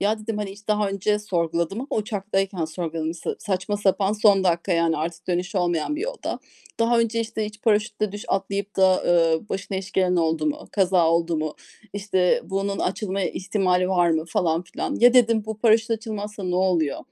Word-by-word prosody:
ya 210 +2 +1
dedim, 215 0 -4
hani, 205 -2 -3
hiç 205 +2 -17
daha 210 -1 +2
önce 200 +2 0
sorguladım 170 -2 -1
ama 265 - -5
uçaktayken 195 -4 -2
sorguladım, 160 0 -4
sa 165 - -4
saçma 195 +1 -2
sapan 200 0 +1
son 205 -3 +4
dakika, 175 +1 +1
yani 165 -1 +2
artık 160 +2 -4
dönüşü 180 +2 -1
olmayan 175 - 0
bir - - -4
yolda, - - -4 0.4
"Daha 235 +1 +3
önce, 230 0 +1
işte, 220 -1 -3
hiç 210 0 -8
paraşütle 215 -1 +1
düş 205 0 -7
atlayıp 200 +1 -2
da, 190 - +5
aaa, 170 0 +2
başına 195 0 -4
iş 190 +1 -6
gelen 185 -1 +2
oldu 160 -2 +1
mu, 150 - -3
kaza 185 -4 +3
oldu 165 0 +1
mu, 155 -1 -3 0.4
işte 195 -3 +1
bunun 195 +1 -2
açılma 195 +1 -2
ihtimali 185 -1 0
var 175 -2 +3
mı?" 160 -1 0
falan 165 0 0
filan. 180 - -4
"Ya." 245 +1 +7
dedim, 230 -3 +4
"Bu 220 -1 -5
paraşüt 225 0 +3
açılmazsa 210 -2 -4
ne 180 -1 -1
oluyor?" 180 -6 +1
195 Hz, 185 wpm, -24 LUFS, 175-210 Hz, 0.4 s, Ya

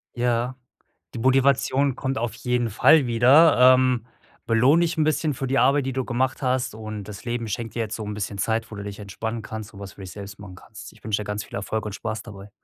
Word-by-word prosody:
Ja, 120 +1 0 0.6
die - - -5
Motivation 135 +1 +2
kommt 135 0 -3
auf 115 0 -2
jeden 125 -2 -1
Fall 140 +7 +5
wieder. 130 +2 +6
Ähm, 130 -3 +1 0.4
belohn 125 +8 +4
dich 170 -1 0
'n 155 - +3
bisschen 155 0 0
für 135 +1 -4
die 135 +1 +1
Arbeit, 140 0 +3
die 135 - -2
du 130 0 -2
gemacht 130 +1 -1
hast 130 -4 -1
und 110 -1 -6
das 105 -1 -9
Leben 120 -1 -3
schenkt 115 +2 -5
dir - - -3
jetzt 110 - -5
so 110 - -5
'n 105 - -4
bisschen 105 -1 -4
Zeit, 110 +3 -1
wo - - -7
du 100 - -6
dich 100 0 -7
entspannen 110 +3 -5
kannst 110 +1 -8
und 100 - -12
was 100 -1 -8
für - - -13
dich 95 -1 -8
selbst 100 0 -9
machen 95 -3 -10
kannst. 100 +2 -12
Ich - - -23
wünsche 105 -1 0
dir - - -6
ganz 105 0 -3
viel - - -11
Erfolg 105 +2 -3
und 105 - -5
Spaß 110 +2 -5
dabei. 100 -2 -11
115 Hz, 240 wpm, -24 LUFS, 105-130 Hz, 0.6 s, wieder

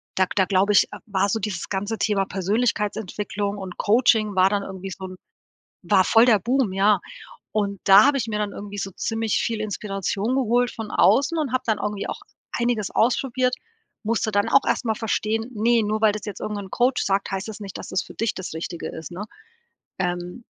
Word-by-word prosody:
da 190 - +3
da 190 - +4
glaube 195 +2 +2
ich, - - +6
äh, - - -7
war 200 -1 0
so 225 - 0
dieses 190 -4 -4
ganze 205 +3 -2
Thema 200 -3 +1
Persönlichkeitsentwicklung 205 0 -1
und 190 -2 -7
Coaching 215 -2 +3
war 185 +1 +5
dann 200 -1 0
irgendwie 190 0 -7
so 190 0 -7
'n 185 0 -8 0.7
war 185 +1 +4
voll 225 +4 +5
der 225 -4 +5
Boom, 240 +1 +1
ja. 200 0 +4 0.5
Und 200 -2 -1
da 195 +3 +8
habe 285 0 +3
ich 230 -4 -2
mir 210 -1 -2
dann 210 -1 -1
irgendwie 205 0 -8
so 195 -1 -4
ziemlich 225 +3 -1
viel 225 -2 -1
Inspiration 205 +2 -2
geholt 245 -1 +2
von 220 -2 -7
außen 285 +5 +3
und 295 -6 -1
habe 255 0 0
dann 220 -2 0
irgendwie 205 -1 -3
auch - - -5 0.3
einiges 235 -4 -1
ausprobiert, 250 +2 +1 0.5
musste 220 0 0
dann 205 0 +1
auch 275 - +4
erst - - 0
mal 220 - +2
verstehen: 225 +1 -1
„Ne, 230 +2 +3
nur 215 +1 -1
weil 220 -1 +5
das 210 -1 -6
jetzt 205 - -7
irgendein 205 -2 -4
Coach 250 +4 +1
sagt, 195 +1 0
heißt 195 +2 -3
das 220 0 -7
nicht, 195 -2 -7
dass - - -8
das 185 - -1
für - - -12
dich 225 0 -2
das 185 - -6
Richtige 165 +1 -5
ist,“ 160 +1 -8
ne? 190 +4 -6 0.7
Ähm, 180 +4 -3
210 Hz, 205 wpm, -23 LUFS, 195-225 Hz, 0.7 s, da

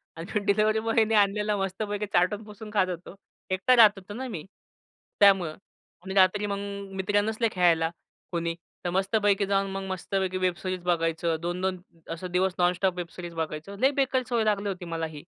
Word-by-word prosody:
आणि 165 - -7
मी - - +4
डिलिव्हरी 215 +2 +3
बॉयनी 225 0 +2
आणलेला 210 +1 +2
मस्तपैकी 205 +2 -2
चाटून-पुसून 210 +4 -1
खात 190 -3 +3
होतो. 180 +2 -7 0.3
एकटा 190 +7 +3
राहत 220 -4 +8
होतो 195 +2 -9
ना 260 +3 -5
मी, 170 -10 -6 0.8
त्यामुळं. 190 -6 +5 0.5
आणि 190 - -4
रात्री 195 +2 +4
मग 200 -1 -2 0.4
मित्र 205 +2 +1
नसले 220 +2 0
खेळायला 170 -3 +3 0.4
कोणी 170 -1 -1 0.3
तर - - +1
मस्तपैकी 195 +2 +2
जाऊन 195 0 +1
मग 195 0 -4
मस्तपैकी 190 0 -2
वेबसिरीज 185 0 -1
बघायचं 165 -1 0
2-2 180 +2 -2 0.3
असं, 165 +2 -5
दिवस 185 +1 +1
नॉनस्टॉप 180 +1 +2
वेबसिरीज 175 0 -6
बघायचो. 160 +4 -4
लय 265 +5 +4
बेकार 265 -2 +1
सवय 235 -2 +2
लागली 205 -1 +1
होती, 180 -2 -5
मला 165 -1 -3
ही. 150 -2 -9
190 Hz, 165 wpm, -27 LUFS, 175-210 Hz, 0.8 s, राहत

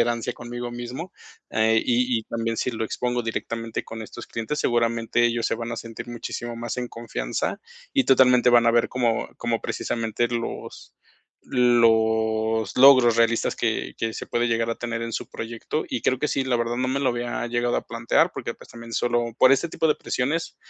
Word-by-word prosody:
tolerancia 120 +1 0
conmigo 120 0 -6
mismo, 125 +9 -6 0.4
eh, 110 0 +3
y 125 0 +2
y 110 - -6
también 115 0 -3
si 125 - -1
lo 110 0 -2
expongo 125 +2 -2
directamente 115 0 -4
con 115 0 -7
estos 115 +2 -9
clientes, 115 +6 -4
seguramente 115 0 +1
ellos 115 -1 +1
se - - 0
van 115 +1 -5
a 115 - -4
sentir 115 +1 -8
muchísimo 120 0 -5
más 120 0 -4
en 125 -1 -3
confianza, 115 0 -3 0.3
y 270 - +3
totalmente 125 -1 +5
van 120 -1 +5
a 115 - +5
ver 120 - +3
como 120 -3 0
como 120 -1 -1
precisamente 115 0 -1
los, 120 -1 -5 0.5
los 110 -3 +2
logros 130 -3 +7
realistas 115 0 +2
que - - -1
que 115 0 -2
se - - -6
puede 120 0 0
llegar 115 0 0
a - - -1
tener 115 -1 -4
en 115 0 -4
su - - -4
proyecto, 115 +7 -4
y 115 - -3
creo 130 - +1
que 150 - 0
sí, 135 - 0
la 125 -2 +1
verdad 120 0 -1
no 130 +1 0
me 135 +2 0
lo 130 -2 +2
había 120 0 -3
llegado 120 0 0
a - - -3
plantear, 115 0 +1
porque, - - -4
pues, - - -16
también 115 0 -10
solo 120 -1 0
por 130 - +7
ese 155 +5 +2
tipo 160 - 0
de 150 - +4
presiones 150 +6 -2
120 Hz, 195 wpm, -24 LUFS, 115-125 Hz, 0.5 s, logros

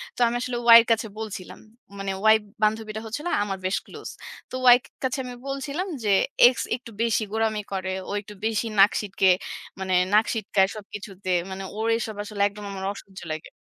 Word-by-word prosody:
তো - - -11
আমি 235 - -1
আসলে 250 -1 -2 0.2
Y - - +13
এর - - -7
কাছে 225 0 +2
বলছিলাম। 205 -4 -7 0.4
মানে 195 -1 -2 0.2
Y - - +6 0.3
বান্ধবীটা 215 0 0
হচ্ছিল 270 +9 -5
না - - -1
আমার 195 -1 -3
বেশ 190 - +1
ক্লোজ। - - -9 0.4
তো - - -5 0.2
Y - - +3
কা - - -18
কাছে 260 +1 -1
আমি 250 -1 -7
বলছিলাম 280 +7 -3 0.2
যে, 205 -2 +3 0.4
"X - - -15 0.2
একটু 235 -2 -11
বেশি 225 -1 +1
গোরামি 220 -1 0
করে, 190 0 -2 0.2
ও - - -4
একটু 210 0 -12
বেশি 225 +1 0
নাক 200 +2 +8
সিটকে 195 -2 +1 0.5
মানে 185 -1 0 0.2
নাক 215 +2 +6
সিটকায় 195 -3 +1
সবকিছুতে। 200 -2 -7 0.2
মানে 190 +1 -5 0.2
ওর 225 - 0
এসব 220 -2 -5
আসলে 210 -1 -10
একদম 205 0 -9
আমার 190 -1 -5
অসহ্য 190 -2 -12
লাগে" 155 - -7
215 Hz, 195 wpm, -25 LUFS, 195-230 Hz, 0.5 s, Y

